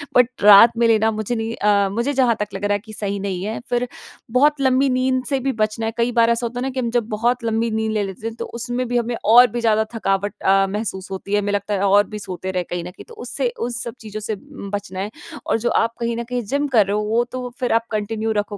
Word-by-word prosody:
But 250 -1 +5
रात 210 +3 +8
में 235 0 +3
लेना 220 0 +3
मुझे 215 +3 -2
नहीं 225 0 -3
अ, 200 -1 +2
मुझे 235 +8 -1
जहाँ 255 -4 +3
तक 210 - -1
लग - - -4
रहा 205 - +2
है 205 - 0
कि 215 +1 -13
सही 200 -1 -3
नहीं 190 -2 -3
है। 215 +2 -3
फिर 245 0 0 0.4
बहुत 290 +4 +3
लंबी 265 +1 +3
नींद 255 0 +1
से 275 +2 0
भी 270 +1 -1
बचना 215 0 -1
है 225 - -1
कई 235 +1 +1
बार 230 -1 +3
ऐसा 235 +1 +1
होता 240 +1 -4
है - - -2
ना 265 - -1
कि 260 0 -4
हम 240 -2 -1
जब 240 -2 0
बहुत 240 +3 0
लंबी 225 0 0
नींद 220 0 -1
ले 215 -1 0
लेते 195 +3 -6
हैं, 225 - -6
तो - - -5
उसमें 245 +1 -4
भी 245 - 0
हमें 240 0 -1
और 240 +4 +8
भी 240 - -3
ज़्यादा 220 -1 +3
थकावट 200 -2 0
अ, 195 0 +4
महसूस 195 -2 -4
होती 195 +1 -5
है 205 - +4
हमें 205 0 -2
लगता 205 +1 -1
है 195 - 0
और 205 0 +4
भी 210 - -7
सोते 185 -1 -5
रहे 180 -1 -1
कहीं 175 0 -5
न 180 - -7
कहीं। - - -13
तो - - -11
उससे - - -2
उस 245 0 -2
सब 235 - -6
चीज़ों 215 -1 -7
से 215 +1 -3 0.4
बचना 195 -2 -6
है 205 +2 -3 0.4
और - - +1
जो 240 +2 0
आप 230 0 -2
कहीं 235 0 -1
न 235 - -2
कहीं 250 0 -1
जिम 285 +1 +1
कर 210 - +6
रहे 200 +1 -1
हो 210 - 0
वो 225 +3 +1
तो 250 -1 -4
फिर 250 - 0
आप 230 0 +2
कंटिन्यू 220 +1 -2
रखो 205 0 -4
225 Hz, 280 wpm, -21 LUFS, 205-240 Hz, 0.4 s, रात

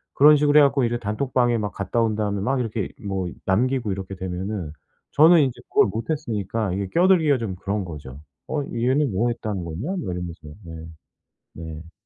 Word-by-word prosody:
그런 150 +1 +7
식으로 145 +1 +4
해 - - +7
갖고 140 -2 +3
이제 120 +1 0
단톡방에 120 +2 0
막 105 -1 -3
갔다 100 +4 -1
온 110 -2 +1
다음에 105 -2 -1
막 130 +5 0
이렇게 110 -3 -3 0.2
뭐 95 -2 -2 0.2
남기고 120 +2 +1
이렇게 95 0 -5
되면은 95 -2 -4 0.4
저는 160 +2 +6
인제 130 -4 -1
그걸 - - +4
못 110 +9 -5
했으니까 110 - -2
이게 100 0 -2
끼어들기가 170 -6 +4
좀 100 -5 -4
그런 100 +1 -3
거죠. 75 -5 -9 0.3
"어 150 - -1
얘는 130 +3 +1
뭐 120 +5 +1
했다는 105 -6 -3
거냐?" 90 - -4
막 190 - -2 0.2
이러면서 85 -4 -7
네 80 -1 -9 0.7
네. 80 0 -9
105 Hz, 370 characters per minute, -23 LUFS, 95-130 Hz, 0.7 s, 그런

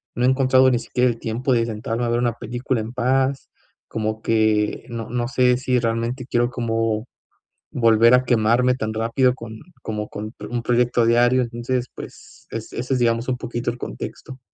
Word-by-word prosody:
no 125 - +1
he 130 - +5
encontrado 130 0 +4
ni 120 - +2
siquiera 125 +1 +1
el 115 - -3
tiempo 125 +4 -1
de 115 -1 +2
sentarme 115 +2 -3
a - - -1
ver 120 - +1
una 120 -2 +1
película 120 +1 -3
en 115 +3 -7
paz, 130 +2 0 0.4
como 110 0 -3
que 110 -2 +1
no 115 -2 -5
no 120 0 -1
sé 125 -2 +3
si 125 -1 +1
realmente 115 +2 -2
quiero 120 +1 +2
como 115 -2 -1 0.7
volver 115 0 +5
a 125 0 +2
quemarme 120 +2 +3
tan 110 -3 -3
rápido 115 +3 +2
con 115 -3 -9 0.3
como, 105 -1 -4
con 110 +3 -7 0.2
un 120 - 0
proyecto 120 0 +2
diario, 120 +2 +4
entonces, 120 +1 -2
pues, - - -12
es 115 -1 -6
ese 125 +2 -2
es, - - 0
digamos, 115 0 +1
un 125 - 0
poquito 120 -1 -3
el 120 - -9
contexto. 125 - -7
120 Hz, 185 wpm, -22 LUFS, 115-125 Hz, 0.7 s, he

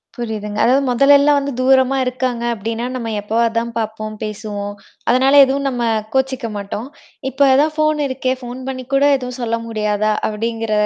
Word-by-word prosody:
புரியுதுங்க. 215 -3 -5
அதாவது 265 +3 +3
முதலெல்லாம் 280 +3 +5
வந்து 280 0 -3
தூரமா 260 +1 +3
இருக்காங்க 250 -1 -2
அப்படின்னா 225 +2 -4
நம்ம 230 -3 -4
எப்போவாது 225 +2 0
தான் 235 0 -4
பார்ப்போம் 215 -1 -4
பேசுவோம். 205 -1 -5 0.4
அதனால 260 +3 +4
எதுவும் 275 +1 -1
நம்ம 245 -2 -3 0.3
கோச்சிக்க 265 -2 0
மாட்டோம். 205 +4 -5 0.4
இப்ப 275 +2 +3
அதான் 300 +3 +3
ஃபோன் 310 -1 +1
இருக்கே, 260 -1 -1
ஃபோன் 245 +1 -7
பண்ணி 255 -1 -5
கூட 275 - +3
எதுவும் 250 0 -7
சொல்ல 230 -1 -1
முடியாதா, 215 -1 0 0.2
அப்படிங்கிற 225 +1 -3
240 Hz, 155 wpm, -18 LUFS, 220-265 Hz, 0.4 s, முதலெல்லாம்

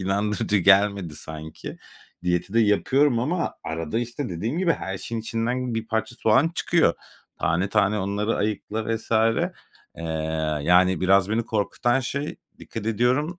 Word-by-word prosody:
inandırıcı 100 +2 0
gelmedi 100 -3 +3
sanki. 80 +1 -8 0.4
Diyeti 90 +3 -1
de 115 - +5
yapıyorum 120 +5 +3
ama 160 +9 -1
arada 80 +5 -3
işte, 120 +3 -4
dediğim 105 - -3
gibi 180 -2 +3
her 95 -9 -5
şeyin 115 +3 -4
içinden 115 +2 -2
bir 115 0 -3
parça 110 +1 -2
soğan 115 +8 +3
çıkıyor. - - +2 0.4
Tane 90 +4 +1
tane 100 +1 +2
onları 100 +3 -1
ayıkla 110 +2 -2
vs. 110 - -12 0.9
Eee, 85 - -7 0.6
yani, 90 +2 +4
biraz 95 +1 +4
beni 115 +1 0
korkutan 120 +4 0
şey, 140 +3 -3 0.2
dikkat 110 -2 -7
ediyorum 125 - +1
110 Hz, 140 wpm, -24 LUFS, 95-120 Hz, 0.9 s, de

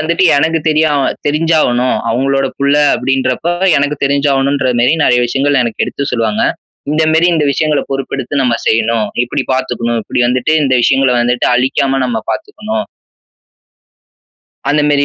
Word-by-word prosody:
வந்துட்டு 170 +4 0
எனக்கு 160 +3 +1
தெரியா 155 0 +2 0.4
தெரிஞ்சாகணும். 150 -5 +1
அவங்களோட 135 +3 0
புள்ள 140 +1 +1 0.2
அப்படின்றப்ப 135 +4 -1 0.3
எனக்கு 145 +1 -1
தெரிஞ்சாகணும்ன்ற 140 -1 +1
மாரி 125 +6 +3
நெறைய 125 0 +3
விஷயங்கள் 135 +2 +1
எனக்கு 115 -2 -3
எடுத்து 140 - -4
சொல்லுவாங்க, 115 -3 0 0.5
"இந்த 155 +1 +1
மாரி 165 +2 +3
இந்த 150 -2 +1
விஷயங்கள 155 0 0
பொறுப்பெடுத்து 135 0 -3
நம்ம 120 -2 +1
செய்யணும், 115 -1 +1 0.2
இப்படி 120 - -3
பாத்துக்கணும், 120 -2 -2
இப்படி 125 - -1
வந்துட்டு 130 +5 0
இந்த 130 -2 +1
விஷயங்கள 135 0 +2
வந்துட்டு 125 +1 0
அழிக்காம 135 +1 0
நம்ப 115 -2 -2
பாத்துக்கணும்." 220 - -4 1.8
அந்த 150 +1 +2
மாரி 145 -1 +2
135 Hz, 135 wpm, -13 LUFS, 125-150 Hz, 1.8 s, மாரி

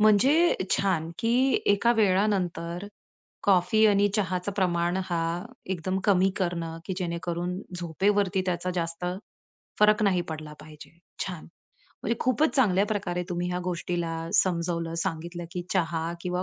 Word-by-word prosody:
म्हणजे 265 - +5 0.2
छान! 170 -5 +1
की, 230 +1 +1 0.3
एका 205 +4 +4
वेळानंतर 190 -4 +1 0.6
कॉफी 195 +3 +4
आणि 205 0 +4
चहाचं 185 -1 -1
प्रमाण 175 -1 +1
हा 175 -2 -1 0.5
एकदम 185 +3 -2
कमी 190 -1 +4
करणं, 170 -3 -2
की 190 - -3
जेणेकरून 175 +1 -3 0.2
झोपेवरती 190 +3 +1
त्याचा 180 0 -1
जास्त 165 0 -3 0.8
फरक 210 0 +5
नाही 190 -4 +3
पडला 155 -1 -6
पाहिजे. 155 +2 -14 0.3
छान! 180 -4 -7 0.6
म्हणजे 230 - 0
खूपच 275 +5 +2
चांगल्या 205 -5 +3
प्रकारे 190 -4 -2
तुम्ही 175 0 -2
ह्या 180 - -1
गोष्टीला 175 -2 -2 0.2
समजवलं, 170 -2 +1
सांगितलं 170 -1 -4
की, 180 - -3
चहा 165 -2 0
किंवा 180 +1 -2
180 Hz, 130 wpm, -27 LUFS, 170-200 Hz, 0.8 s, म्हणजे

